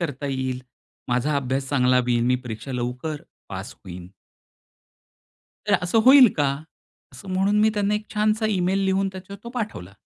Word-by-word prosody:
करता 145 -4 -3
येईल. 130 -2 -3 0.5
माझा 125 +4 +1
अभ्यास 135 0 -2
चांगला 125 -2 +3
होईल 120 0 +2
मी 125 0 +3
परीक्षा 115 +4 -6
लवकर 125 +5 -4 0.3
पास - - -7
होईन. 90 -1 -10 1.6
तर - - +3
असं 180 +5 +1
होईल 260 -2 +9
का? 145 - +2 0.7
असं 195 - -12
म्हणून 195 +2 +2
मी 215 - +5
त्यांना 205 0 +1
एक 210 0 -3
छानसा 215 +1 +1
ईमेल 190 -1 +1
लिहून 190 0 +1
त्याच्यावर 190 +1 -10
तो - - -6
पाठवला. 210 - -5
150 Hz, 155 wpm, -23 LUFS, 125-200 Hz, 1.6 s, होईल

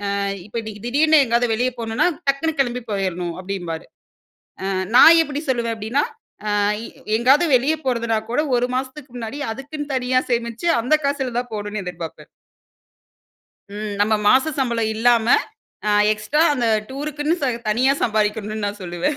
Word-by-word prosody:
ஆ - - -1 0.3
இப்ப 210 - -15
இன்னைக்கி 215 -2 -9
திடீர்னு 300 +5 +4
எங்கயாவது 240 0 +1
வெளியே 245 +3 0
போகணுன்னா, 230 +5 0 0.2
டக்குனு 275 +4 +1
கெளம்பி 250 -2 0
போயிரணும் 180 -3 -2
அப்டின்பாரு. 180 -4 -5 0.8
அ - - -1 0.3
நான் 330 +6 +9
எப்டி 295 -2 -4
சொல்லுவேன் 235 -3 0
அப்டினா? 225 +7 0 0.5
அ - - +2 0.6
எங்காவது 270 +8 +4
வெளியே 290 +6 +1
போறதுனா 235 -3 0
கூட 290 +5 +1
1 245 +1 +1
மாசத்துக்கு 265 +1 -5
முன்னாடி 235 +5 -6
அதுக்குன்னு 290 +4 -6
தனியா 255 0 +1
சேமிச்சு, 235 +6 -1
அந்த 250 +6 +2
காசில 270 -3 -2
தான் 245 -1 -4
போணும்னு 205 0 -4
எதிர்பார்ப்பேன். 170 -2 -7 1.5
ம், 210 -1 -4
நம்ம 215 +2 +2
மாச 260 +7 +4
சம்பளம் 235 -4 0
இல்லாம, 230 0 +3 0.6
அ - - +3 0.2
எக்ஸ்ட்ரா 215 +9 0
அந்த 245 -4 0 0.2
டூருக்குன்னு 295 +4 -2
ச - - +2 0.2
தனியா 250 +6 +3
சம்பாதிக்கணும்னு 215 -1 0
நான் 205 +1 -5
சொல்லுவேன். 175 - -2
240 Hz, 145 wpm, -21 LUFS, 215-275 Hz, 1.5 s, நான்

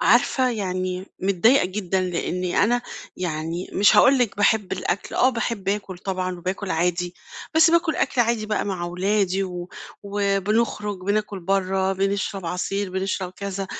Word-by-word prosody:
عارفة، 260 -1 +3
يعني 185 -3 -3 0.2
متضايقة 200 +7 +4
جدًا 190 0 -1
لأني 180 0 -1
أنا 240 +3 +1 0.3
يعني 165 0 -3
مش 205 +2 +5
هاقول 270 +1 +6
لِك 240 -6 0
باحب 205 -1 +2
الأكل، 190 +1 -2
آه 255 - +4
باحب 230 -5 -3
آكُل 195 -2 -2
طبعًا 185 -1 -3
وباكُل 185 +2 -4
عادي، 175 +1 0 0.4
بس 320 +1 +6
باكُل 335 -1 +2
أكْل 250 - +1
عادي 230 -2 +1
بقى 210 -1 -1
مع 190 -3 -3
أولادي 190 +2 0
و 180 -1 -6 0.3
وبنخرُج 205 +1 0
بناكُل 205 +1 -1
برّه، 190 +1 +1
بنشرب 195 -1 -1
عصير، 195 +3 -2
بنشرب 190 0 -2
كذا 195 -1 -4
195 Hz, 145 wpm, -23 LUFS, 185-210 Hz, 0.4 s, هاقول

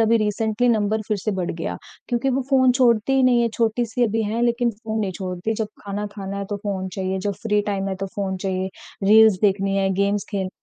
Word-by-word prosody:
अभी 225 +1 +4
recently 220 +3 0
number 220 -1 +1
फिर 215 - +1
से 215 - +1
बढ़ 175 - -2
गया। 165 0 -4 0.3
क्योंकि 240 +2 0
वो 265 +1 0
फ़ोन 260 -2 +5
छोड़ती 245 -1 +3
ही 265 -1 +3
नहीं 245 -2 +4
है, 235 - +2
छोटी 230 +1 0
सी 240 +2 0
अभी 225 0 0
हैं 220 +3 -1
लेकिन 240 0 +2
फ़ोन 220 0 -5
नहीं 195 -3 -1
छोड़ती। 185 +3 -3
जब 215 -1 -2 0.2
खाना 205 +1 -3
खाना 200 -1 -5
है 200 - -3
तो 205 - -1
फ़ोन 195 -2 -3
चाहिए, 190 +1 -3
जब 200 +2 -2
फ्री 210 -2 +2
टाइम 195 -1 -1
है 190 - -2
तो 195 +1 -4
फ़ोन 195 -2 -2
चाहिए, 185 0 -2 0.4
रील्स 215 0 +6
देखनी 195 -1 +2
है, 195 0 +2
गेम्स 200 +1 +1
खेल 195 -3 -2
210 Hz, 230 wpm, -22 LUFS, 195-230 Hz, 0.4 s, रील्स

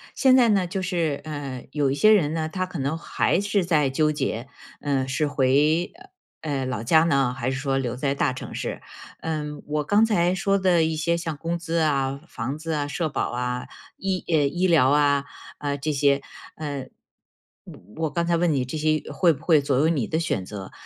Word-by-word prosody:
现 265 -2 +5
在 245 -3 +5
呢， 195 -3 +3
就 185 +2 -3
是， 170 -6 -1
呃， 145 -4 -6
有 145 -2 +1
一 - - 0
些 215 +8 +5
人 165 -8 +3
呢， 160 -1 -2
他 185 +3 -2
可 180 -3 -7
能 140 +4 -1
还 170 - 0
是 205 -1 +1
在 155 -5 +2
纠 150 +3 +2
结， 135 -5 -3 0.3
嗯， 135 -2 0
是 145 +3 0
回， 145 +5 +2 0.5
呃， 155 -2 -3
呃， 130 - -2
老 125 -4 -3
家 160 +7 +5
呢， 140 -6 +2
还 130 0 -1
是 130 - -3
说 135 0 0
留 125 -3 -2
在 140 +2 -1
大 135 -1 +1
城 130 - -8
市。 - - -4 0.4
嗯， 150 -2 -4
我 150 0 -1
刚 205 +8 +3
才 180 -5 +2
说 195 +1 +1
的 180 -3 +3
一 160 0 0
些 170 +2 0
像 165 -3 -4
工 170 +2 -3
资 170 0 -2
啊、 140 -4 +1
房 130 +2 -4
子 165 +1 -5
啊、 145 -1 -1
社 160 +3 -2
保 - - -2
啊、 125 0 -3 0.3
医 190 -2 -2
哎， 165 - +3
医 150 +6 +1
疗 155 -7 +5
啊， 145 -1 +3 0.3
啊， 145 -1 -2
这 150 +3 -2
些。 140 -1 +2 0.3
呃， 145 -4 -5 0.8
我 160 +10 -7
我 - - -1
刚 170 +3 -1
才 170 0 +2
问 170 0 +2
你 130 -3 0
这 130 - -6
些 155 0 +1
会 175 -3 +4
不 145 - -13
会 160 -4 +5
左 140 -2 0
右 150 +4 +3
你 150 -8 0
的 160 - -1
选 165 - -1
择？ 95 0 -8
150 Hz, 225 characters per minute, -24 LUFS, 135-170 Hz, 0.8 s, 现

